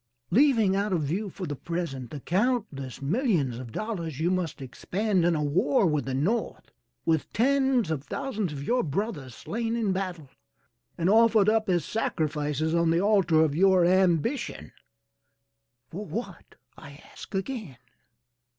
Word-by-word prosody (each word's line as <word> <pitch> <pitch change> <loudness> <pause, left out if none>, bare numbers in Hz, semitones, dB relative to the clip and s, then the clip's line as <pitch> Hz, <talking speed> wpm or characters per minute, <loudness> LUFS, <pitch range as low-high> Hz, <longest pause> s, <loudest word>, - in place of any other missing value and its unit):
Leaving 225 -4 +4
out 200 +1 0
of 170 -4 +1
view 190 +9 -2
for 185 - -6
the 145 -3 -4
present 140 -6 -4
the 150 - -7
countless 180 - -1
millions 160 - 0
of 125 -3 -8
dollars 170 - -4
you 170 +3 +1
must 180 -5 -2
expend 185 - -1
in 170 0 +3
a 150 - 0
war 185 - +2
with 150 -5 +1
the 135 - -3
North, 205 - -2 0.3
with 160 -2 0
tens 265 - +2
of 145 -4 -2
thousands 215 - -3
of 140 -1 -6
your 245 - +1
brothers 145 - -3
slain 230 +1 -3
in 220 -4 0
battle, 180 -7 -4 0.7
and 170 0 0
offered 220 0 +5
up 220 -2 +1
as 175 -5 +1
sacrifices 155 -6 -1
on 170 -1 +2
the 165 +1 +3
altar 190 -5 +3
of 155 -3 +1
your 185 0 +4
ambition 185 - +1 1.2
for 195 +5 -5
what, 200 -4 -7 0.2
I 145 -2 -12 0.2
ask - - -10
again? 195 - -4
180 Hz, 150 wpm, -27 LUFS, 150-215 Hz, 1.2 s, offered